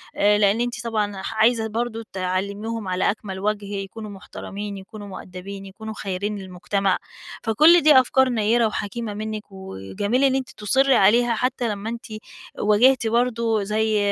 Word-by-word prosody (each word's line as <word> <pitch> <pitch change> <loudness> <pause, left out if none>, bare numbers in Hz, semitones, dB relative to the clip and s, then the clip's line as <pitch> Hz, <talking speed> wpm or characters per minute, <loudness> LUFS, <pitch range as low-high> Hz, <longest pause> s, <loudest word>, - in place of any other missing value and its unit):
آآ، 205 0 +4
لإن 205 +2 +3
أنتِ 240 0 -3
طبعًا 210 -4 -2
ح 210 - -5
عايزة 220 0 +3
برضه 230 +1 -3
تعلّميهم 200 +4 -3
على 185 +1 +1
أكمل 195 -2 -7
وَجه، 210 0 -1
يكونوا 200 +2 -6
محترمين، 200 +1 -7
يكونوا 205 +2 -10
مؤدبين، 195 +1 -8
يكونوا 220 +3 -8
خيرين 205 +1 -3
للمجتمع، 190 +1 -1 0.5
فكل 310 +10 +6
دي 295 -3 +7
أفكار 260 +1 +3
نيّرة 230 0 +2
وحكيمة 215 +1 -4
منِّك، 215 0 -4
وجميل 190 - -2
إن 265 -1 +4
أنتِ 265 -1 -2
تُصرّي 265 +6 +2
عليها، 230 +4 +4
حتى 250 0 -1
لما 210 +1 -4
أنتِ 235 0 -6 0.5
واجِهتي 225 +3 +4
برضه 230 -2 +1
زي 215 +1 +1
215 Hz, 150 wpm, -23 LUFS, 200-235 Hz, 0.5 s, دي